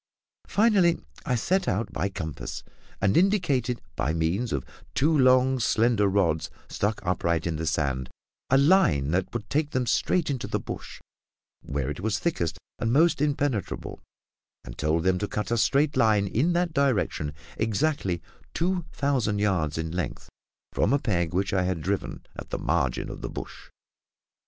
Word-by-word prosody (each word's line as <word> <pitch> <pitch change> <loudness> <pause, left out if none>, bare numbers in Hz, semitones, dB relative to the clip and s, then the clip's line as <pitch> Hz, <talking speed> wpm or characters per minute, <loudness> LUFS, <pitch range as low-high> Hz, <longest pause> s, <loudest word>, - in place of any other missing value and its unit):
Finally, 200 -6 +3 0.3
I 125 - +2
set 185 +10 +1
out 100 0 -1
by 100 - -1
compass, 75 -8 -6 0.4
and 95 0 +2
indicated, 150 - +2
by 75 - 0
means 85 +9 0
of 65 - -2 0.3
two 155 +4 +3
long 130 -1 +4
slender 115 -2 +3
rods 90 -5 +1 0.2
stuck 105 +2 -1
upright 85 -2 0
into 80 -2 -2
the 80 - -2
sand, 70 -4 -1 0.4
a 135 - +5
line 135 - +4
that 95 +2 0
would 115 -3 -5
take 150 +4 0
them 130 -3 0
straight 155 +7 +1
into 130 -3 -3
the - - -1
bush - - -8 0.6
where 70 -2 -3
it 75 - -6
was 105 +2 0
thickest 105 - -1 0.2
and 115 - 0
most 155 +2 +4
impenetrable, 145 - -1 0.6
and - - -8
told 80 +2 0
them 95 0 +2
to 105 - -1
cut 105 +1 -3
a - - +3
straight 140 +6 +2
line 105 -3 +4
in 135 - +1
that 175 -1 0
direction, 125 - +1 0.3
exactly 110 - 0 0.3
two 175 0 0
thousand 130 -9 0
yards 90 -8 0
in 80 0 -3
length 90 +1 -4 0.4
from 115 - +2
a - - +5
peg 85 - 0
which 95 +2 0
I 95 - +3
had 90 -2 -1
driven 95 +6 -3
at - - -8
the - - -2
margin 70 -6 0
of - - -8
the - - -4
bush. - - -8
105 Hz, 165 wpm, -26 LUFS, 85-140 Hz, 0.6 s, a